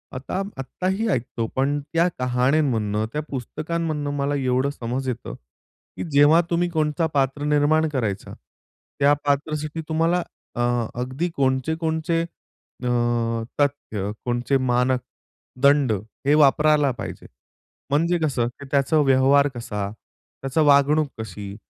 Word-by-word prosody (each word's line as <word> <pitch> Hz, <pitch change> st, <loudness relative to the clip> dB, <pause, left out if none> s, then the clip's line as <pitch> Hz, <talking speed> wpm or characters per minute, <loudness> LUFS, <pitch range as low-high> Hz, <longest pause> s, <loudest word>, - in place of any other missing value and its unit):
आता 135 Hz, +9 st, -3 dB, 0.2 s
आत्ताही 185 Hz, -, -2 dB
ऐकतो, 120 Hz, -4 st, -2 dB
पण 140 Hz, +2 st, +1 dB
त्या 170 Hz, +1 st, +4 dB
कहाण्यांमधनं, 125 Hz, -4 st, +1 dB
त्या 150 Hz, -, -1 dB
पुस्तकांमधनं 155 Hz, +3 st, -3 dB
मला 140 Hz, +1 st, 0 dB
एवढं 130 Hz, 0 st, +1 dB
समज 130 Hz, -1 st, -4 dB
येतं, 120 Hz, -2 st, -5 dB, 0.6 s
की -, -, -3 dB
जेव्हा 145 Hz, +4 st, +6 dB
तुम्ही 175 Hz, +1 st, +1 dB
कोणता 155 Hz, -1 st, 0 dB
पात्र 140 Hz, 0 st, 0 dB
निर्माण 150 Hz, +2 st, +3 dB
करायचा, 110 Hz, -9 st, -3 dB, 0.7 s
त्या 145 Hz, +1 st, +5 dB
पात्रासाठी 150 Hz, +2 st, -1 dB
तुम्हाला 165 Hz, +2 st, +1 dB, 0.3 s
अ, -, -, -5 dB, 0.4 s
अगदी 130 Hz, +8 st, -2 dB
कोणचे 130 Hz, +3 st, +1 dB
कोणचे 160 Hz, 0 st, -1 dB, 0.6 s
अ, 125 Hz, -, -1 dB, 0.7 s
तथ्य, 110 Hz, -8 st, -1 dB
कोणचे 120 Hz, +2 st, +1 dB
मानक 125 Hz, 0 st, +1 dB, 0.6 s
दंड 140 Hz, -3 st, +4 dB, 0.4 s
हे 145 Hz, -, +5 dB
वापरायला 150 Hz, 0 st, +4 dB
पाहिजे. 120 Hz, -, -7 dB, 0.6 s
म्हणजे 165 Hz, +5 st, +2 dB
कसं, 135 Hz, -7 st, 0 dB
की 130 Hz, +4 st, -10 dB
त्याचा 140 Hz, +2 st, +2 dB
व्यवहार 135 Hz, +1 st, +4 dB
कसा? 105 Hz, -4 st, -4 dB, 0.5 s
त्याचा 135 Hz, +3 st, 0 dB
वागणूक 145 Hz, +1 st, +4 dB
कशी? 100 Hz, -2 st, -7 dB
140 Hz, 120 wpm, -23 LUFS, 125-155 Hz, 0.7 s, जेव्हा